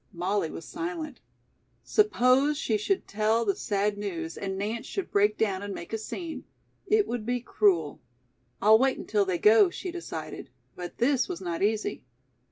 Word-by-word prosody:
Molly 180 0 -1
was 165 - -8
silent. 335 -4 -5 0.6
Suppose 280 - +3
she 230 -7 0
should 290 - 0
tell 220 +2 +1
the 200 - +1
sad 205 -1 -1
news 165 -5 -4
and 195 -1 -4
Nance 215 +4 -3
should 390 -3 -4
break 205 +1 +3
down 195 -3 0
and 205 -1 -5
make 170 - -8
a - - +1
scene. 325 +8 -6 0.4
It 425 0 +3
would 240 -2 -3
be 245 +2 -1
cruel. 185 -10 +1 0.6
"I'll 220 +1 +7
wait 265 +1 +2
until 205 -2 0
they 185 -2 0
go," 225 - +6
she 360 +1 -6
decided. 350 0 -7 0.3
But 175 -1 -7
this 255 +2 +2
was 170 - -4
not 175 -3 -4
easy. 215 +1 0
215 Hz, 170 wpm, -28 LUFS, 195-270 Hz, 0.6 s, I'll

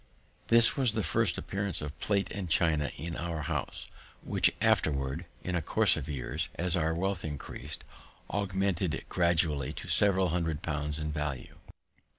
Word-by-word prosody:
This 115 -1 +7
was 130 -5 +2
the - - 0
first - - +1
appearance 100 -3 -2
of 75 +2 -6
plate 100 -1 0
and 95 -4 -4
China 80 -3 +2
in 85 +3 -5
our 85 -2 -3
house, 75 -3 -3 0.4
which - - +3
afterward, 70 +3 +1 0.2
in 90 - -3
a 90 - +1
course - - +3
of 75 - -5
years, 70 -5 -3
as 90 0 +1
our 80 -1 +1
wealth 95 +1 -1
increas'd, 75 -3 -6 0.5
augmented 95 -3 -1
gradually 80 -5 +1
to - - -7
several 95 -3 +4
hundred 80 -2 -1
pounds 75 -1 -2
in 75 -1 -3
value. 75 -3 -4
85 Hz, 155 wpm, -30 LUFS, 75-95 Hz, 0.5 s, This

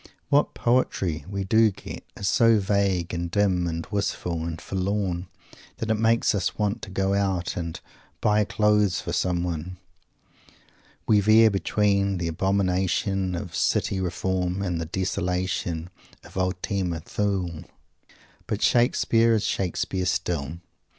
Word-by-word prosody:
What 145 +1 +2
"poetry" 95 - 0
we 100 -1 -2
do 110 +3 +4
get 95 - -9
is 100 - -3
so 115 +4 +5
vague 95 -4 0
and 85 0 -2
dim 90 -2 +1
and 85 0 -3
wistful 90 -5 -2
and 85 -1 -4
forlorn 95 -1 -2 0.5
that 110 -1 -2
it 110 - +1
makes 115 +1 +3
us 100 -4 -1
want 105 0 -1
to - - -7
go 95 +1 0
out 95 -2 0
and 85 -2 -4 0.4
"buy 105 0 +3
clothes" 105 -2 +2
for - - -5
someone. 90 -1 -1 1.3
We 105 - +4
veer 110 +2 +6
between 100 0 +1
the 85 -1 -2
abomination 95 +1 0
of 90 -2 -6
city 95 - +1
reform 95 +1 -1
and 90 -4 -2
the - - -3
desolation 90 -1 -2 0.3
of - - -15
Ultima 90 -1 -1
Thule. 95 -4 -2 0.8
But - - -2
Shakespeare 115 -1 +3
is 105 - 0
Shakespeare 95 0 -1
still. 80 -4 -1
95 Hz, 130 wpm, -25 LUFS, 90-105 Hz, 1.3 s, veer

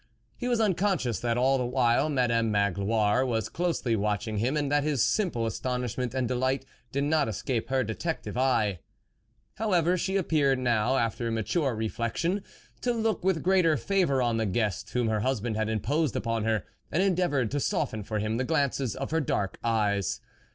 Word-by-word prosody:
He 245 - -4
was 240 -2 +1
un 215 -4 +3
conscious 180 - 0
that 120 -1 0
all 135 +2 +3
the - - 0
while 125 +3 +2
Madame 120 -5 +1
Magloire 105 +3 +2
was 115 -4 -1
closely 165 -9 0
watching 105 +1 -1
him, 130 +7 0
and 145 -1 -1
that 145 0 +3
his 145 -5 +1
simple 175 - +1
astonishment 125 +1 -2
and 130 -2 0
delight 130 +2 0 0.3
did 140 +2 0
not 150 0 +2
escape 115 +2 -2
her 130 -1 +2
detective 110 - -4
eye. 115 -8 +1 0.8
How 220 -2 -1
ever, 175 +1 +3
she 190 +3 0
appeared 150 -7 +2
now, 120 0 +1
after 115 0 -1
mature 120 - 0
reflexion, 115 - -1 0.4
to 245 - +1
look 225 -5 -1
with 185 -3 +1
greater 180 -4 +3
favour 175 -10 +1
on 120 -2 +1
the 110 -1 0
guest 105 0 -1
whom 125 -2 0
her 110 -1 +1
husband 120 -1 -1
had 110 0 -1
imposed 140 - 0
upon 115 -2 -1
her, 110 -3 +1 0.3
and 175 +5 +2
endeavoured 175 - +1
to 145 - 0
soften 110 -5 -1
for 110 +1 -3
him 110 +2 -1
the 130 - 0
glances 140 -6 0
of 135 +2 -5
her 160 0 +2
dark 100 -8 -2
eyes. 105 -4 +1
125 Hz, 180 wpm, -28 LUFS, 110-155 Hz, 0.8 s, un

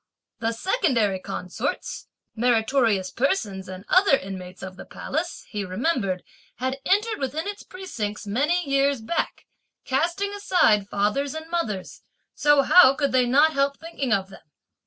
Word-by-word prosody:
The 225 0 0
secondary 230 - +1
consorts, 195 +7 -4 0.3
meritorious 225 -4 +2
persons 215 - -1
and 185 +1 -8
other 370 -7 +5
inmates 185 -3 -8
of 185 -1 -7
the - - -9
Palace, 325 +4 -4
he 210 -2 -3
remembered, 195 - -1 0.3
had 260 +2 -3
entered 425 +3 +2
within 285 +6 -3
its 410 0 -5
precincts 225 - -6
many 290 - 0
years 275 -1 +2
back, 225 +10 -3 0.4
casting 340 +9 0
aside 225 - +2
fathers 240 +9 0
and 315 0 -6
mothers, 215 - -3 0.3
so 295 -1 +4
how 275 -4 +7
could 280 0 0
they 255 -1 +3
not 295 +6 +4
help 280 0 +1
thinking 320 -6 -4
of 195 -3 +1
them? - - -13
265 Hz, 140 wpm, -24 LUFS, 205-315 Hz, 0.4 s, how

